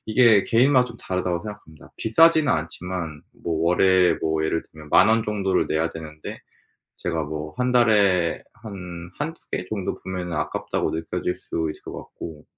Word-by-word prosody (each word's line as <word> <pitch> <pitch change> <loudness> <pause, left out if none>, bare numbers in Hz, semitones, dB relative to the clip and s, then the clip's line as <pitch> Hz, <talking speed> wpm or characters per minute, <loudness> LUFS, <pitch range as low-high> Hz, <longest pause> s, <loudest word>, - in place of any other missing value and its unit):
이게 110 -2 +5
'개인마다 125 +2 +4
좀 115 -1 -10
다르다.'고 90 -1 -2
생각합니다. 105 -8 -11
비싸지는 155 +6 +4
않지만 85 -1 -4 0.2
뭐 80 -1 -1
월에 90 0 +4
뭐 80 0 0
예를 80 +1 0
들면 75 -1 -12
10,000 - - +6
원 115 0 +4
정도를 100 -3 0
내야 80 +1 +1
되는데 80 -1 -8 0.6
제가 80 -2 -2
뭐 75 +1 -5
1 125 0 +1
달에 100 -8 +3
한 90 -6 -8
1-2 160 +3 -4
개 90 - -2
정도 100 -4 -2
보면은 90 -2 -4
'아깝다.'고 75 - -2
느껴질 90 +2 -2
수 80 -1 -3
있을 - - -14
것 - - -8
같고 80 -3 -9
90 Hz, 310 characters per minute, -24 LUFS, 80-110 Hz, 0.6 s, 10,000